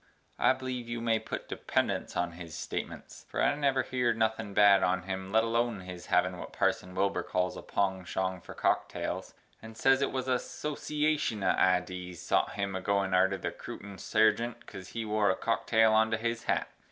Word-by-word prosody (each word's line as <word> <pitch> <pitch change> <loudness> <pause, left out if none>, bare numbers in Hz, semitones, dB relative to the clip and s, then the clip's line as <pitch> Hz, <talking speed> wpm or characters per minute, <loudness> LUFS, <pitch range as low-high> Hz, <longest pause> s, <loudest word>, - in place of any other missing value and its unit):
I - - +5
bleeve 130 -2 -5
yu 120 0 -3
may 115 -1 +1
put 110 - -6
dependunts - - -1
on 90 0 0
his 85 -2 -9
statemence. - - -6
For - - -5
I - - +4
never 140 -2 +1
heered 125 -3 0
nothin 110 -1 0
bad 100 -2 +7
on 95 0 +1
him 95 0 -5
let 110 +1 +4
Alone 115 -2 0
his 90 -1 -9
havin 90 0 +2
what - - -7
Parson 90 0 0
Wilbur 100 +1 +1
cals 90 0 -1
a - - -7
pongshong 95 -1 -1
for - - -11
cocktales, - - -1 0.3
and 110 0 -11
ses 135 +2 +4
it 140 - +1
wuz 130 -1 -1
a 125 -1 +2
soshiashun 150 -6 -1
of - - +4
idees 90 -1 0
sot - - +1
him 100 -1 -2
agoin 95 0 0
arter 95 +1 +3
the - - -3
Crootin 100 -1 -9
Sargient 115 +2 +1
cos 95 -1 -9
he 115 +4 -4
wore 105 -1 +2
a 95 - +2
cocktale 110 0 +2
onto 110 +1 +3
his 115 0 -2
hat. - - +1
105 Hz, 185 wpm, -30 LUFS, 95-115 Hz, 0.3 s, bad